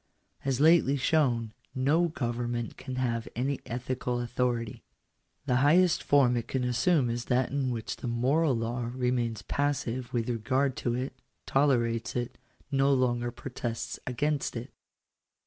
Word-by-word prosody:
As 135 -2 0
lately 155 -2 +5
shown, 125 -6 +1 0.2
no 150 +7 +3
government 120 -5 -3
can 130 -1 -6
have 115 -3 -1
any 135 +4 -1
ethical 125 0 -2
authority. 120 -1 -2 0.6
The 125 -3 +2
highest 170 +6 +4
form 135 -4 +4
it 120 -1 -2
can 130 -1 -1
assume 125 +4 +2
is 120 +1 -2
that 125 0 +1
in 135 -2 0
which 115 -2 -4
the - - -5
moral 130 +5 +2
law 115 +1 -2
remains 120 -3 -1
passive 130 -4 -1
with 115 -3 -1
regard 130 +3 0
to 120 -1 -1
it 130 +1 -3 0.2
— - - -48
tolerates 120 -5 +1
it 120 0 -3 0.2
— - - -33
no 135 0 +3
longer 120 -2 +1
protests 120 -2 -5
against 145 +4 -1
it. 115 +1 -6
125 Hz, 145 wpm, -29 LUFS, 120-135 Hz, 0.6 s, lately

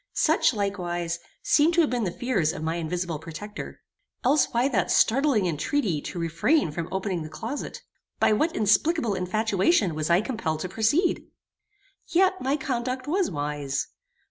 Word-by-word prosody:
Such, 315 -3 +3
likewise, 175 -4 -2 0.2
seem 305 +3 +4
to 340 - +5
have 305 - +1
been 240 -3 0
the 180 - -1
fears 215 -9 0
of 155 - -6
my 160 +2 -1
invisible 170 -1 -3
protector. 170 +7 -8 0.4
Else 280 +4 +4
why 240 +2 +2
that 210 -10 0
startling 260 -4 +3
intreaty 175 - 0
to - - -6
refrain 165 - +1
from 165 +2 -4
opening 190 -2 -2
the 155 - -6
closet? 230 - -6 0.4
By - - +4
what 310 +10 +1
inexplicable 220 +4 +2
infatuation 200 - +1
was 155 +1 -2
I 170 +3 +4
compelled 180 -10 -3
to 185 - -4
proceed? 225 - +1 0.8
Yet 375 +2 +2
my 270 +3 +1
conduct 255 -2 -3
was 365 +4 +1
wise. 145 -2 -3
205 Hz, 155 wpm, -26 LUFS, 170-265 Hz, 0.8 s, to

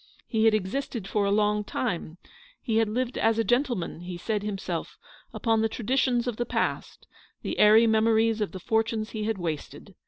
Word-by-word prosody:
He 220 -2 +1
had 220 -1 +5
existed 215 +1 -3
for 205 0 0
a 200 - +1
long 210 0 +2
time 180 -7 -3 0.2
— - - -27
lie 225 - +1
had 225 -1 +2
lived 245 +3 -2
as 225 0 +2
a 225 - +2
gentleman, 240 - 0
he 175 0 -7
said 210 +3 -2
himself 205 -2 -4 0.2
— - - -27
upon 225 -2 +1
the 225 - +1
traditions 245 +1 0
of 245 -3 -3
the 240 - 0
past, - - -2 0.4
the - - -3
airy 215 +2 +7
memories 225 0 +3
of 210 - -1
the 190 - -7
fortunes 220 +2 -1
he 215 -1 -3
had 220 -1 -1
wasted. 160 -5 -5
220 Hz, 195 wpm, -27 LUFS, 210-230 Hz, 0.4 s, airy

